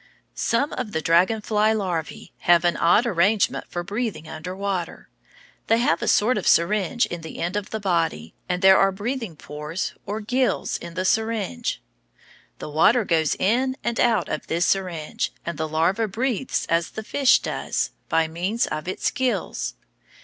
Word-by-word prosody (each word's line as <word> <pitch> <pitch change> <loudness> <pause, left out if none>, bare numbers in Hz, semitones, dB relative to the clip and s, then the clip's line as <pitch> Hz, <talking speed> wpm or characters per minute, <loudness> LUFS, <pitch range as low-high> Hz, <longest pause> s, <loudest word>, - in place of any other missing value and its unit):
Some 260 +6 0
of 240 -5 -4
the 160 - -1
dragon 180 +8 +3
fly 215 +1 +2
larvæ 180 -6 -4
have 175 0 +4
an 175 - +3
odd 175 +8 +4
arrangement 205 0 +2
for 175 - -4
breathing 205 -4 -4
under 170 +4 -6
water. 195 -3 -4 0.6
They 225 - +4
have 200 -8 +1
a - - -2
sort 215 +3 +3
of - - -4
syringe 205 +6 +3
in 175 -1 -6
the 160 - -9
end 175 +3 -2
of 205 -1 -3
the 220 - -3
body, 165 - -1 0.2
and 180 +1 -1
there 190 0 +7
are 195 - +4
breathing 220 -1 -4
pores 150 +4 -5
or 210 +2 -2
gills 250 +4 0
in 170 -1 -9
the 185 0 -1
syringe. 220 - -1 0.7
The - - -7
water 210 +10 +4
goes 160 -4 +2
in 255 +6 +1
and 235 -1 -1
out 235 -3 +3
of - - -4
this 170 +2 +1
syringe, 180 -5 -1
and 170 -3 -4
the 160 - -1
larva 170 +8 +1
breathes 245 +4 -1
as 165 0 +1
the 220 - -7
fish 270 +3 +4
does, - - -2 0.2
by 165 0 +2
means 180 +8 -1
of 155 +3 -5
its 185 - -1
gills. 260 -1 -2
190 Hz, 170 wpm, -23 LUFS, 170-220 Hz, 0.7 s, there